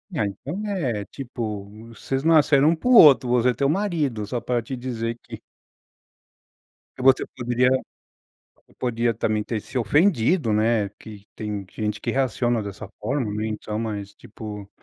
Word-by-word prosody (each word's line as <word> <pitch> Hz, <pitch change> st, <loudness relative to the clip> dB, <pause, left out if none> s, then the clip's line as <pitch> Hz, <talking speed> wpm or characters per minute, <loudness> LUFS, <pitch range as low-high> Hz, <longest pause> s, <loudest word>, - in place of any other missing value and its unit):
Ah, 105 Hz, -, +1 dB
então 145 Hz, -, -5 dB
é, 130 Hz, -, -1 dB
tipo, 115 Hz, -6 st, -5 dB, 0.2 s
vocês 135 Hz, +4 st, -4 dB
nasceram 150 Hz, -2 st, +5 dB
um 165 Hz, -, +3 dB
para 250 Hz, -, -4 dB
o -, -, +6 dB
outro, 140 Hz, -, +8 dB
você 125 Hz, 0 st, +3 dB
é -, -, +2 dB
teu 140 Hz, +2 st, 0 dB
marido, 155 Hz, -, -1 dB
só 120 Hz, +3 st, -3 dB
para 120 Hz, -1 st, -1 dB
te 125 Hz, +4 st, -8 dB
dizer 115 Hz, -2 st, -4 dB
que -, -, -10 dB, 1.5 s
Você 130 Hz, 0 st, +4 dB
poderia 125 Hz, 0 st, +1 dB, 0.9 s
você -, -, -29 dB
podia 120 Hz, -2 st, 0 dB
também 110 Hz, -1 st, -1 dB
ter 110 Hz, -3 st, -3 dB
se 130 Hz, -, -5 dB
ofendido, 145 Hz, -, +2 dB
né, 110 Hz, -1 st, +2 dB
que 105 Hz, -2 st, -12 dB
tem 105 Hz, -2 st, -4 dB
gente 105 Hz, -1 st, -3 dB
que -, -, -2 dB
reaciona 120 Hz, -3 st, 0 dB
dessa 100 Hz, 0 st, -7 dB
forma, 120 Hz, -2 st, -1 dB
né, 110 Hz, +1 st, -2 dB
então, 105 Hz, 0 st, -4 dB
mas 105 Hz, -3 st, -4 dB
tipo 105 Hz, -1 st, -9 dB
120 Hz, 160 wpm, -23 LUFS, 105-135 Hz, 1.5 s, outro